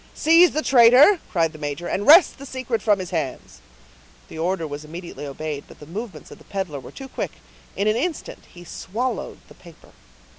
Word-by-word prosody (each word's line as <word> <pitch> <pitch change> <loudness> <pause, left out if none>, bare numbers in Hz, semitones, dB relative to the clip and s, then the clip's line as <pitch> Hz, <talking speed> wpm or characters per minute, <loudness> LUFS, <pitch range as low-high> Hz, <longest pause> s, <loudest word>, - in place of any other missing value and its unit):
"Seize 335 +3 +5
the 310 - -2
traitor!" 260 - +6
cried 165 -3 0
the 155 - -12
major, 145 +3 -5
"and 205 +4 -3
wrest 330 -1 +7
the 275 - -9
secret 255 -3 -3
from 210 -2 +2
his 185 -2 -7
hands." 155 -7 -5 0.7
The - - -9
order 170 0 -1
was 145 0 -7
immediately 165 -1 -8
obeyed; 145 +1 -6
but - - -16
the 150 - -11
movements 205 +7 -8
of - - -12
the - - -17
peddler 190 -8 -5
were - - -12
too 270 - -10
quick; - - -5 0.4
in 200 - -1
an 215 - +2
instant 310 +6 -4
he 175 - -13
swallowed 225 +8 -4
the - - -16
paper. - - -18
190 Hz, 195 wpm, -22 LUFS, 160-255 Hz, 0.7 s, wrest